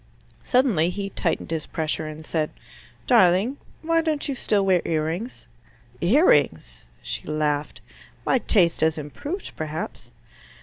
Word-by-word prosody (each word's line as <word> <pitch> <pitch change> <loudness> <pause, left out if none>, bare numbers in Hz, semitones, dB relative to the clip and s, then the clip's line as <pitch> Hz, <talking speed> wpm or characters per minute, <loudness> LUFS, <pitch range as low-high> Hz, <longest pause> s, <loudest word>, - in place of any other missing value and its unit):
Suddenly 235 - +2
he 195 +2 -4
tightened 165 -2 -2
his 160 -2 -2
pressure, 155 0 -2
and 155 +1 -8
said, 155 -2 -1 0.6
"Darling, 220 +2 +4 0.3
why 330 +1 +2
don't 310 -3 -1
you 280 - -1
still 210 -6 +1
wear 185 -3 +3
ear 155 -2 0
rings?" 180 +10 -5 0.5
"Ear 260 - +4
rings?" 80 - +2
She - - -5
laughed. 150 -1 -1 0.4
"My 260 - +3
taste 180 -8 +2
has 160 0 +2
improved, 285 - -6
perhaps." 155 0 -5
170 Hz, 135 wpm, -24 LUFS, 155-240 Hz, 0.6 s, Darling